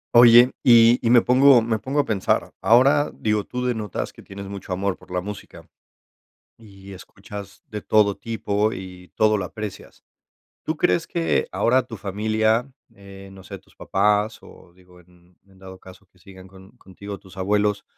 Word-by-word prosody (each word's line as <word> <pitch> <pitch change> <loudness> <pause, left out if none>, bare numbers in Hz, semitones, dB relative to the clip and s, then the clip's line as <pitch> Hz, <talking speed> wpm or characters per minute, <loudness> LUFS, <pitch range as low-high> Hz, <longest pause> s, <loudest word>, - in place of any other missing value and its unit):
Oye, 120 +1 +7
y 120 0 +6
y 115 - 0
me 120 -1 +5
pongo 130 -1 +5
me 110 -1 -2
pongo 135 +7 -1
a - - -7
pensar. 100 -4 -1
Ahora, 135 +5 +4
digo, 105 -1 -1
tú 125 0 -5
denotas 110 -5 -4
que - - -15
tienes 100 0 -10
mucho 100 -1 -9
amor 95 +1 -2
por - - -21
la 90 0 -3
música, 105 +1 -10 0.9
y 100 -3 -15
escuchas 100 +2 -12
de 105 -1 -7
todo 105 -2 +2
tipo 110 -1 -2
y 90 -1 -10
todo 110 0 +2
lo 100 - -3
aprecias, 105 +1 -9 0.6
tú 155 0 -4
crees 170 -1 +1
que 170 -1 -1
ahora 130 +2 +2
tu 115 -4 -10
familia, 110 +4 0 0.3
eh, 100 0 -13
no 95 - -14
sé, - - -10
tus - - -28
papás 105 +2 0
o, 85 - -17
digo, 90 0 -21
en 90 0 -26
en 95 -1 -23
dado 95 0 -12
caso 95 +1 -16
que 90 - -31
sigan 95 -1 -15
con 95 0 -17
contigo 100 +2 -10
tus 95 0 -18
abuelos, 105 +2 -1
105 Hz, 175 wpm, -22 LUFS, 95-115 Hz, 0.9 s, Oye